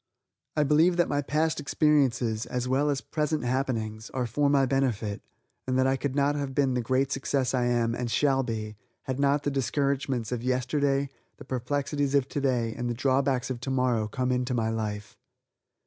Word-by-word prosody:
I 150 - +4
believe 160 +5 +4
that 175 - +3
my 145 0 0
past 155 +3 0
experiences, 135 -7 +1
as 125 0 -2
well 135 +3 +2
as 140 -2 0
present 150 -2 -1
happenings, 115 -4 -2
are 125 -1 0
for 140 +5 +1
my 140 -1 +4
benefit, 120 -6 -1 0.5
and 130 0 +1
that 130 - +3
I 135 0 +3
could 135 0 -3
not 140 0 +2
have 140 -2 -3
been 135 -2 +2
the 125 - 0
great 130 +3 0
success 135 -1 0
I 125 -2 +1
am, 120 -1 +1
and 120 0 -3
shall 135 +2 +2
be, 110 -4 -4 0.3
had 130 -1 -3
not 140 +1 +2
the 145 - 0
discouragements 135 -3 -1
of 125 -2 -2
yesterday, 135 +2 0 0.3
the - - -11
perplexities 140 +2 -1
of 135 -2 +3
today 125 -6 0
and 120 0 -3
the 120 - -2
drawbacks 130 0 +1
of 125 - -4
tomorrow 125 -4 0
come 125 +3 -1
into 125 0 0
my 110 -1 0
life. 105 -2 -4
130 Hz, 185 wpm, -27 LUFS, 120-140 Hz, 0.5 s, I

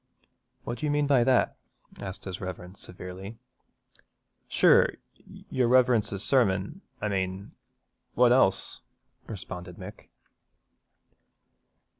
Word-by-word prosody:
'What 120 0 -5
do 155 - -2
you - - 0
mean 145 0 +2
by 135 -4 +4
that?' 130 -2 +2 0.4
asked 95 -2 -6
his 95 -1 -6
Reverence 90 0 -7
severely. 95 +4 -8 1.1
'Sure, - - +4 0.6
your 125 -2 +2
Reverence's 120 -5 +3
sermon, 115 - +1 0.2
I 105 - -2
mane, 95 0 -3 0.6
what 125 -1 +5
else?' 95 -7 +3 0.5
responded 90 -4 -8
Mick. 100 +2 -11
100 Hz, 100 wpm, -27 LUFS, 95-125 Hz, 1.1 s, what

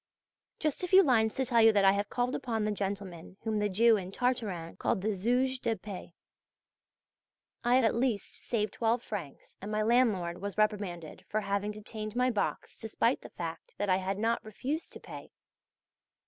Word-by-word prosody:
Just 305 +1 -1
a - - 0
few 380 +2 +7
lines 225 -7 +3
to 265 - 0
tell 235 -1 +4
you 225 0 +8
that 200 -1 +4
I 195 - +8
have 200 +1 -1
called 245 +1 -1
upon 225 -5 -1
the 215 - 0
gentleman 195 -3 -4
whom 220 -2 0
the 210 0 +1
Jew 225 +3 +5
in 185 -1 -6
"Tartarin" 210 -9 -2
called - - 0
the 215 0 +1
"Zouge 250 +6 +1
de 230 -2 0
paix." 190 -2 -8 1.5
I 240 +1 +4
have, 260 - +5
at 225 - +3
least, 235 -3 -1
saved 215 -4 -1
twelve 230 +1 +1
francs, 180 -10 -7
and 205 +2 -5
my 215 0 +1
landlord 210 -7 +2
was 200 0 -5
reprimanded 200 -7 -1
for 215 - 0
having 200 0 -1
detained 215 +1 -6
my 250 +1 +3
box 210 - -2
despite - - 0
the - - -10
fact - - -7
that 205 - -1
I 185 - +4
had 190 +1 -2
not 230 +2 0
refused 265 +9 -4
to - - -9
pay. - - -10
215 Hz, 190 wpm, -31 LUFS, 200-240 Hz, 1.5 s, you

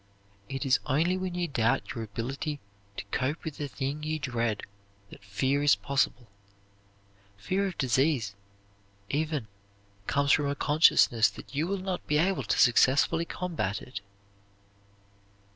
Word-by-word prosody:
It 135 +1 -3
is 135 0 +4
only 160 +6 +2
when 185 -1 -3
you 175 -1 -1
doubt 120 -3 0
your 115 -2 -4
ability 135 +8 -4 0.4
to - - -5
cope 140 +5 -1
with 160 -3 -6
the 145 - -3
thing 140 +2 -4
you 155 +1 -2
dread 120 -6 -2 0.5
that - - -13
fear 130 +8 0
is 145 0 +5
possible. 135 -3 -1 1.1
Fear 190 - -1
of 185 - -6
disease, 130 -5 +1 0.8
even, 150 -5 -1 0.6
comes 140 0 +2
from 145 0 +3
a 140 - -1
consciousness 145 -6 +4
that - - -12
you 150 +4 0
will 200 +1 -1
not 185 -1 -4
be 150 - +2
able 185 +5 +2
to - - -1
successfully 140 +6 +4
combat 165 - -3
it. 125 -5 -8
140 Hz, 145 wpm, -28 LUFS, 125-160 Hz, 1.1 s, is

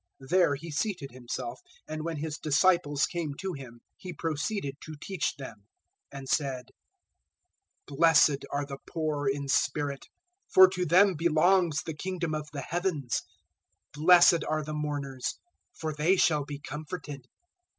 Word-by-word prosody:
There 175 -6 +4
He 160 +4 -8
seated 160 -3 -3
Himself, 125 0 -6 0.3
and 155 0 -5
when 165 -1 -3
His 150 0 -4
disciples 150 -1 +2
came 165 -5 -4
to 190 +4 -4
Him, 135 -5 -9
005:002 120 - -19 0.2
He 180 -1 -8
proceeded 160 0 -3
to 155 - -8
teach 185 -2 -2
them, 110 -7 -10 0.5
and 135 -1 -8
said: 130 -4 -1 1.2
005:003 140 - -9
"Blessed 160 -4 +5
are 145 0 -1
the 140 -1 -8
poor 155 -4 -2
in 140 +1 -1
spirit, 140 +1 0 0.4
for 190 0 +8
to 180 -1 -2
them 185 +5 +5
belongs 170 0 +2
the 160 - -5
Kingdom 175 0 -3
of 150 -1 -4
the 145 - -5
Heavens. 165 - -2 0.7
005:004 150 - -7
"Blessed 175 -1 +7
are 155 0 0
the 155 +1 -6
mourners, 145 -3 -3 0.4
for 155 - -5
they 155 +6 +2
shall 150 -5 +2
be 145 0 -6
comforted. 150 -2 -7
150 Hz, 150 wpm, -28 LUFS, 140-170 Hz, 1.2 s, for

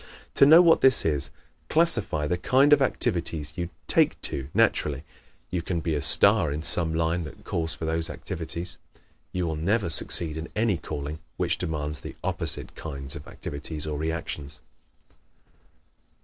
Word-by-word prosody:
To 140 - +6
know 165 +4 +8
what 165 -2 +5
this 130 -2 +5
is, 70 -5 0 0.4
classify 120 - +2
the 90 - 0
kind 135 +11 +3
of 145 - +4
activities 85 - -1
you 85 -1 -4 0.2
"take - - +2
to" 70 0 -5
naturally. 70 -2 +1 0.5
You 90 -2 -1
can 85 0 -3
be 80 0 -2
a 75 - -1
star 70 +1 +6
in 75 +2 -4
some 80 -1 +3
line 85 +1 0
that 75 - -12
calls 80 -1 -2
for 80 - -6
those 80 0 +1
activities. 85 0 -6 0.5
You 90 -1 -2
will 80 -1 -2
never 95 +4 0
succeed 80 -1 0
in 80 +1 -6
any 110 -4 +1
calling 75 0 -6 0.2
which - - -1
demands 75 -1 -3
the - - -9
opposite - - -2
kinds 70 -4 -7
of 70 - -10
activities 75 +1 -5
or 75 -2 -4
reactions. 75 -2 -5
80 Hz, 160 wpm, -26 LUFS, 75-90 Hz, 0.5 s, know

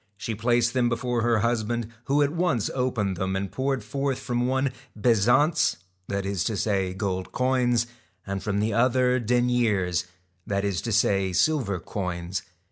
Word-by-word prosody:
She 110 +2 -4
placed 120 +2 +1
them 125 -2 +2
before 120 0 -1
her 115 -2 +2
husband, 115 0 0 0.2
who 145 +2 +3
at 145 - +1
once 170 - 0
opened 115 -7 -1
them 95 +1 -1
and 95 0 -3
poured 135 0 -1
forth 135 -1 -2
from 120 -1 -1
one 130 +1 +1 0.3
bezants, 125 +8 +3 0.3
that 100 0 -2
is 100 -4 -1
to 110 - -1
say 95 -3 0
gold 95 -2 -3
coins, 125 -2 +2 0.4
and 100 -1 -3
from 100 +1 -1
the 110 0 0
other 125 +2 +3
deniers, 115 -7 +1 0.4
that 100 0 0
is 100 -3 -1
to 115 - -3
say 100 -3 +2
silver 120 - +1
coins. 90 0 -4
115 Hz, 160 wpm, -26 LUFS, 100-125 Hz, 0.4 s, who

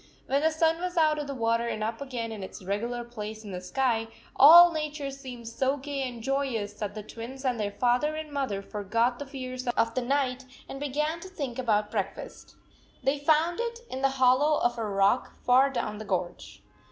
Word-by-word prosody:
When 275 +2 +1
the 320 - +4
sun 325 +1 +1
was 360 -1 -3
out 310 -2 +3
of 295 - -4
the 280 - -4
water 230 -1 +1
and 215 -2 -3
up 225 +3 -3
again 245 -5 -4
in 215 -2 -6
its 190 - -8
regular 235 +6 -2
place 220 -2 -7
in 205 - -8
the 180 -1 -5
sky, 225 +3 0 0.3
all 340 +5 +10
nature 300 -3 -3
seemed 255 -4 -9
so 265 +4 0
gay 285 0 -4
and 235 -2 -10
joyous 260 -6 -1
that 210 0 -5
the 215 - -6
Twins 245 +5 -8
and 250 -3 0
their 205 -1 0
father 250 +8 +1
and 310 -1 -6
mother 260 -9 -2
forgot 230 +5 -1
the 285 - -6
fears 255 -2 -6
of 230 -1 +1
the 255 - 0
night, 260 0 0 0.2
and 270 - -7
began 300 +3 -1
to 375 - -9
think 280 -9 -5
about 210 -4 +1
breakfast. 200 -4 -5 0.5
They 275 +2 +1
found 315 +5 +2
it 470 0 -3
in 260 - -4
the 270 - +4
hol 255 -1 +4
low 300 +1 +3
of 240 0 +1
a 225 - -1
rock 200 +4 +1
far 260 +2 +5
down 215 -5 -3
the 215 - -7
gorge. 175 - -4
255 Hz, 210 wpm, -28 LUFS, 225-285 Hz, 0.5 s, all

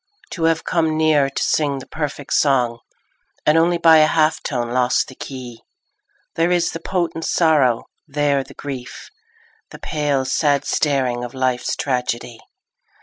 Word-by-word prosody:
To 165 -3 -2
have 165 0 +1
come 160 -3 0
near 155 -3 +3
to 140 - -3
sing 145 -3 +1
the 130 - -8
perfect 145 -2 -5
song 125 -5 +2 0.7
And 150 - +4
only 170 +1 +3
by 165 -1 +6
a 155 0 +6
half 155 0 +2
tone 120 -3 -3
lost 125 0 +1
the - - -10
key, 125 -3 -9 0.7
There 165 +1 +1
is 175 -1 +1
the 165 - -6
potent 170 -3 -2
sorrow, 150 -10 +2 0.2
there 145 -1 0
the - - -15
grief, 130 -3 -8 0.6
The - - -11
pale, 145 -3 -1
sad 140 +1 +1
staring 130 -5 0
of 120 +1 -7
life's 130 -1 -1
tragedy. 125 -3 -3
145 Hz, 150 wpm, -20 LUFS, 130-160 Hz, 0.7 s, by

